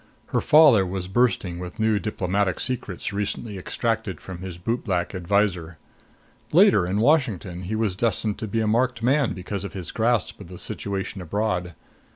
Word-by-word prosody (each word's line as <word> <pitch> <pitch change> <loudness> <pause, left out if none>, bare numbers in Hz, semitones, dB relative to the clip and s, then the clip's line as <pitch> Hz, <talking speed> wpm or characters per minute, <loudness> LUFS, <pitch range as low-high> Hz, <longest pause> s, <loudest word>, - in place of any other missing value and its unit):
Her - - +1
father 145 -10 +6
was 95 0 -4
bursting 95 -5 +1
with 90 +4 -8
new 110 -1 +2
diplomatic 95 -1 -1
secrets 105 -6 -2
recently 100 0 -3
extracted 110 -2 -2
from 90 -2 -8
his 90 -2 -7
bootblack 95 -2 -2
adviser. 90 -3 0 0.7
Later, 90 - +5
in 95 +3 0
Washington, 105 - +1
he 110 +5 -2
was 110 -4 0
destined 110 -1 0
to 110 - -4
be 115 +2 -1
a 110 - 0
marked 115 +1 +1
man 135 +1 +2
because 95 +2 -5
of 100 - -6
his 95 -3 -4
grasp 115 0 0
of - - -9
the 90 +1 -10
situation 95 0 -4
abroad. 90 -1 -2
100 Hz, 165 wpm, -24 LUFS, 90-115 Hz, 0.7 s, father